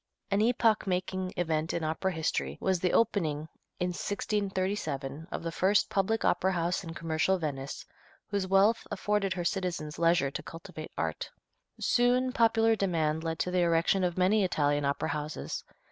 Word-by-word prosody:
An 200 Hz, +1 st, +3 dB
epoch 225 Hz, -2 st, +3 dB
making 185 Hz, 0 st, -1 dB
event 160 Hz, -2 st, 0 dB
in 170 Hz, -, -2 dB
opera 160 Hz, +5 st, -1 dB
history 75 Hz, -, -2 dB
was 190 Hz, -2 st, +1 dB
the 180 Hz, +1 st, +1 dB
opening, 160 Hz, -9 st, +1 dB, 0.3 s
in 180 Hz, -, 0 dB
1637, 185 Hz, -7 st, -2 dB
of -, -, -4 dB
the 165 Hz, -, -2 dB
first 195 Hz, +4 st, +2 dB
public 205 Hz, +3 st, +1 dB
opera 185 Hz, +2 st, +2 dB
house 175 Hz, +2 st, 0 dB
in 165 Hz, -1 st, -7 dB
commercial 165 Hz, +3 st, +1 dB
Venice 140 Hz, -4 st, -4 dB, 0.4 s
whose 200 Hz, -2 st, -2 dB
wealth 195 Hz, +4 st, +3 dB
afforded 205 Hz, -1 st, 0 dB
her 175 Hz, -1 st, -4 dB
citizens 170 Hz, -6 st, -2 dB
leisure 165 Hz, -5 st, +3 dB
to -, -, -4 dB
cultivate 160 Hz, -1 st, -9 dB
art. -, -, -2 dB, 0.5 s
Soon 250 Hz, +1 st, +3 dB
popular 225 Hz, -1 st, +3 dB
demand 160 Hz, -6 st, 0 dB
led 165 Hz, -1 st, -2 dB
to 180 Hz, -, -1 dB
the 180 Hz, -, +1 dB
erection 170 Hz, +2 st, +3 dB
of 175 Hz, -1 st, 0 dB
many 195 Hz, +3 st, +3 dB
Italian 145 Hz, -5 st, +1 dB
opera 140 Hz, +3 st, 0 dB
houses. 150 Hz, 0 st, -4 dB
180 Hz, 160 wpm, -30 LUFS, 160-195 Hz, 0.5 s, An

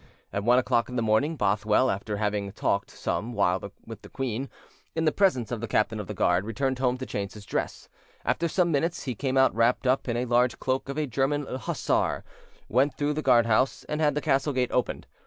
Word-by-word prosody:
At 100 Hz, -, -1 dB
one 120 Hz, +3 st, +5 dB
o'clock 120 Hz, -1 st, +2 dB
in 125 Hz, -, -6 dB
the 120 Hz, -, 0 dB
morning, 110 Hz, +9 st, +2 dB
Bothwell, 105 Hz, +2 st, +2 dB
after 100 Hz, +2 st, -3 dB
having 105 Hz, -1 st, -1 dB
talked 100 Hz, -1 st, -1 dB
some 120 Hz, +3 st, -3 dB
while 95 Hz, -2 st, 0 dB
with 110 Hz, -2 st, -9 dB
the -, -, -13 dB
queen, 130 Hz, 0 st, -3 dB, 0.5 s
in 160 Hz, 0 st, 0 dB
the 155 Hz, -, +4 dB
presence 150 Hz, -, +1 dB
of 120 Hz, -3 st, -3 dB
the 115 Hz, -, -3 dB
captain 110 Hz, +1 st, +1 dB
of 105 Hz, -, -5 dB
the 105 Hz, -, -5 dB
guard, 90 Hz, 0 st, +2 dB
returned 130 Hz, +4 st, -2 dB
home 125 Hz, -1 st, +1 dB
to 130 Hz, -, -5 dB
change 100 Hz, -4 st, -4 dB
his 105 Hz, -1 st, -11 dB
dress; -, -, -3 dB, 0.4 s
after 170 Hz, -, +1 dB
some 175 Hz, +1 st, +1 dB
minutes, 165 Hz, +4 st, 0 dB
he 130 Hz, -, -3 dB
came 130 Hz, +3 st, -1 dB
out 130 Hz, 0 st, +5 dB
wrapped 115 Hz, +3 st, +2 dB
up 130 Hz, +1 st, +2 dB
in 120 Hz, -, 0 dB
the 120 Hz, +1 st, 0 dB
large 120 Hz, 0 st, +2 dB
cloak 130 Hz, +1 st, -2 dB
of 140 Hz, -, -4 dB
a 155 Hz, -, +1 dB
German 140 Hz, +3 st, 0 dB
hussar, 130 Hz, -2 st, -1 dB, 0.4 s
went 135 Hz, +3 st, +2 dB
through 145 Hz, +1 st, 0 dB
the 155 Hz, -, -2 dB
guard 120 Hz, -5 st, +5 dB
house, 115 Hz, +4 st, +1 dB
and 150 Hz, +1 st, -2 dB
had 150 Hz, -2 st, +2 dB
the 150 Hz, -, 0 dB
castle 140 Hz, -1 st, +1 dB
gate 125 Hz, -1 st, 0 dB
opened. 125 Hz, -, -1 dB
125 Hz, 225 wpm, -27 LUFS, 110-140 Hz, 0.5 s, one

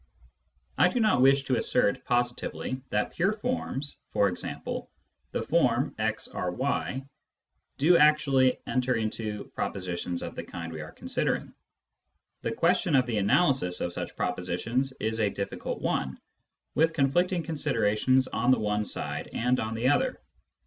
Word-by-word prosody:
I -, -, +7 dB
do 250 Hz, -, 0 dB
not 215 Hz, -, +3 dB
wish 135 Hz, +1 st, +5 dB
to 130 Hz, -3 st, +1 dB
assert 105 Hz, -5 st, +1 dB
positively 120 Hz, +1 st, -1 dB
that 105 Hz, 0 st, -1 dB
pure 190 Hz, +5 st, +2 dB
forms 210 Hz, -, -3 dB
— -, -, -37 dB
e.g. 100 Hz, -3 st, +1 dB, 0.8 s
the -, -, -2 dB
form -, -, +2 dB
"arRy 90 Hz, +13 st, -2 dB, 0.2 s
" -, -, -60 dB
— -, -, -50 dB
do 170 Hz, +5 st, +5 dB
actually 140 Hz, -4 st, +4 dB
enter 125 Hz, 0 st, +1 dB
into 110 Hz, -1 st, -3 dB
propositions 90 Hz, -2 st, -3 dB
of -, -, -5 dB
the -, -, -5 dB
kind 85 Hz, -2 st, -7 dB
we 80 Hz, -, -5 dB
are 80 Hz, -, -8 dB
considering. -, -, -2 dB, 0.9 s
The 115 Hz, -, -2 dB
question 175 Hz, -, +2 dB
of 130 Hz, -1 st, +4 dB
the 115 Hz, -4 st, -1 dB
analysis 105 Hz, -, +2 dB
of 85 Hz, -, -2 dB
such -, -, -5 dB
pro 90 Hz, -, 0 dB
positions 105 Hz, +10 st, -2 dB
is 110 Hz, +1 st, -1 dB
a 105 Hz, -2 st, +3 dB
difficult 100 Hz, 0 st, -4 dB
one, 65 Hz, 0 st, -1 dB, 0.5 s
with 160 Hz, +1 st, +3 dB
conflicting 170 Hz, +5 st, +2 dB
considerations 130 Hz, -4 st, +1 dB
on 125 Hz, +3 st, 0 dB
the 130 Hz, -, +6 dB
one 105 Hz, 0 st, 0 dB
side -, -, -3 dB
and 125 Hz, +2 st, +1 dB
on 110 Hz, +1 st, -2 dB
the 120 Hz, +3 st, +2 dB
other. 255 Hz, -, +1 dB
125 Hz, 150 wpm, -28 LUFS, 105-145 Hz, 0.9 s, I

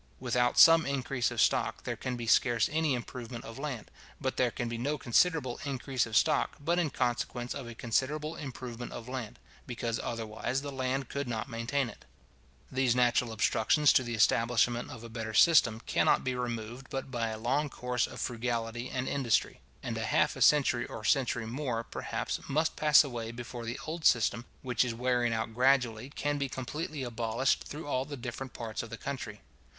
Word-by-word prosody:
Without 125 Hz, -1 st, +1 dB
some 165 Hz, 0 st, +9 dB
increase 135 Hz, -3 st, -1 dB
of -, -, -5 dB
stock, -, -, +2 dB
there -, -, -3 dB
can 130 Hz, -1 st, -4 dB
be 120 Hz, -, -5 dB
scarce 115 Hz, 0 st, +3 dB
any 155 Hz, -3 st, +1 dB
improvement 120 Hz, -1 st, -7 dB
of 115 Hz, +3 st, -9 dB
land, 135 Hz, -7 st, -5 dB, 0.3 s
but 130 Hz, -2 st, -2 dB
there 125 Hz, -, +2 dB
can 120 Hz, +1 st, -4 dB
be 115 Hz, 0 st, -4 dB
no 145 Hz, +5 st, -1 dB
considerable 130 Hz, 0 st, +2 dB
increase 135 Hz, -3 st, -1 dB
of 110 Hz, -1 st, +1 dB
stock, -, -, +2 dB
but 170 Hz, +5 st, +1 dB
in 165 Hz, -4 st, +1 dB
consequence 120 Hz, -1 st, -2 dB
of 130 Hz, -, -6 dB
a 120 Hz, -, -8 dB
considerable 150 Hz, +7 st, -1 dB
improvement 125 Hz, -4 st, -7 dB
of 120 Hz, -, -8 dB
land; 125 Hz, -4 st, -5 dB, 0.3 s
because 120 Hz, -1 st, -2 dB
otherwise 115 Hz, +3 st, -3 dB
the 145 Hz, -, -5 dB
land 130 Hz, 0 st, -2 dB
could 140 Hz, -1 st, -3 dB
not 115 Hz, 0 st, -3 dB
maintain 125 Hz, +3 st, -1 dB
it. 110 Hz, -, -12 dB, 0.7 s
These 130 Hz, -2 st, +2 dB
natural 120 Hz, -1 st, +3 dB
obstructions 110 Hz, +6 st, +3 dB
to -, -, +5 dB
the 120 Hz, -2 st, -3 dB
establishment 115 Hz, +2 st, +2 dB
of 115 Hz, -2 st, -9 dB
a -, -, -7 dB
better 110 Hz, -1 st, -5 dB
system, 115 Hz, -9 st, +5 dB
cannot -, -, +3 dB
be 130 Hz, -, -1 dB
removed 120 Hz, +1 st, -4 dB
but 135 Hz, -2 st, -5 dB
by 120 Hz, -3 st, -1 dB
a 110 Hz, -1 st, -4 dB
long 135 Hz, +7 st, 0 dB
course 125 Hz, -1 st, -1 dB
of -, -, -9 dB
frugality 120 Hz, 0 st, -2 dB
and 130 Hz, 0 st, -3 dB
industry; 130 Hz, -5 st, 0 dB, 0.2 s
and -, -, -3 dB
half -, -, +1 dB
a -, -, -8 dB
century 135 Hz, -5 st, +4 dB
or 110 Hz, -, -7 dB
a -, -, -9 dB
century 125 Hz, -4 st, +2 dB
more, 120 Hz, -1 st, -2 dB
perhaps, -, -, -4 dB
must 155 Hz, +3 st, +1 dB
pass 150 Hz, -1 st, +6 dB
away 120 Hz, -5 st, -5 dB
before 120 Hz, 0 st, -7 dB
the 115 Hz, +2 st, -4 dB
old 160 Hz, +1 st, -5 dB
system, 120 Hz, +1 st, +3 dB, 0.2 s
which 125 Hz, -1 st, +2 dB
is 120 Hz, -2 st, -3 dB
wearing 120 Hz, 0 st, +1 dB
out 110 Hz, 0 st, -2 dB
gradually, 125 Hz, -1 st, +2 dB
can 145 Hz, 0 st, -2 dB
be 140 Hz, -1 st, -1 dB
completely 150 Hz, +3 st, -4 dB
abolished 120 Hz, +1 st, 0 dB
through 155 Hz, +3 st, -7 dB
all 130 Hz, -3 st, 0 dB
the 145 Hz, +1 st, -7 dB
different 125 Hz, +1 st, -6 dB
parts 115 Hz, -2 st, -4 dB
of 115 Hz, -, -8 dB
the 115 Hz, -, -7 dB
country. 120 Hz, -7 st, -6 dB
125 Hz, 190 wpm, -30 LUFS, 115-135 Hz, 0.7 s, some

